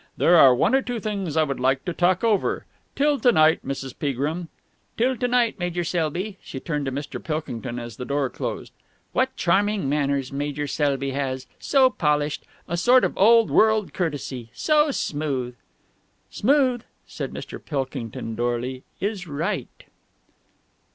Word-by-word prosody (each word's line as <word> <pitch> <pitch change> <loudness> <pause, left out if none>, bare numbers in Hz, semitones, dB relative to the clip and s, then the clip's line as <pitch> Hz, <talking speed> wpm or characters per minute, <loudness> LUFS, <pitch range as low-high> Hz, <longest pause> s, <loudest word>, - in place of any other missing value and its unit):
There 175 - +5
are 135 -6 +8
one 125 - +2
or 270 - +4
two 245 -2 -4
things 195 -7 -3
I 160 - +5
would 140 -3 -3
like 130 +1 +1
to 175 - -2
talk 180 +3 +2
over. 220 -4 +1 0.3
Till 290 0 +2
to 245 - +5
night, 155 -5 +4
Mrs. 135 -1 -5
Peagrim." 150 +5 -2 0.5
"Till 255 +3 +2
to 245 0 -1
night, 245 -3 +1
Major 175 0 -1
Selby." 175 +4 -2
She 130 - -7
turned 150 -1 -3
to - - -1
Mr. 140 +2 -5
Pilkington 125 -6 -4
as 120 -3 -7
the - - -5
door 140 +1 0
closed. - - -5 0.4
"What 260 +1 +1
charming 200 - +1
manners 140 -2 0
Major 145 +1 -2
Selby 140 -2 0
has. 130 -1 -3
So 265 -2 +4
polished. 150 -5 0 0.2
A 170 - -2
sort 250 +8 +5
of - - 0
old 230 +2 +5
world 220 -2 +3
courtesy. 140 -8 -3
So 305 -1 +3
smooth!" 140 - -2 0.8
"Smooth," 255 0 +2 0.2
said - - -6
Mr. - - -8
Pilkington 130 -6 -4
dourly, 120 +2 -2 0.2
"is 195 -2 -3
right!" 160 +7 -4
155 Hz, 155 wpm, -24 LUFS, 135-215 Hz, 0.8 s, are